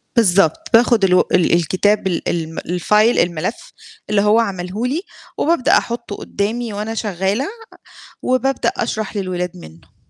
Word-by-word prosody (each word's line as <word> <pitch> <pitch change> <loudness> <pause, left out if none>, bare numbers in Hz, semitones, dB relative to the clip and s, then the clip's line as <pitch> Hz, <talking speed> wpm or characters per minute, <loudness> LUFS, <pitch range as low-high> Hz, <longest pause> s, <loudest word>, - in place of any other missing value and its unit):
بالضبط، 195 -7 +3
باخد 230 -2 +5
الو 180 -1 +5
ال 175 -2 +3
الكتاب 190 +4 +2
ال 175 - -2
ال 165 -1 -3 0.2
الFile 215 +3 +3
الملف 175 +5 -2 0.4
اللي 205 -1 +3
هو 210 +2 +4
عمله 195 +1 -2
لي، 305 +7 -1 0.4
وبابدأ 320 -2 +3
أحطه 235 -3 -4
قدّامي 220 +2 -3
وأنا 215 +2 -4
شغالة، 205 - -1 0.7
وبابدأ 260 +1 +1
أشرح 215 -2 -3
للولاد 180 -2 -3
منه. 80 0 -15
205 Hz, 130 wpm, -18 LUFS, 180-230 Hz, 0.7 s, باخد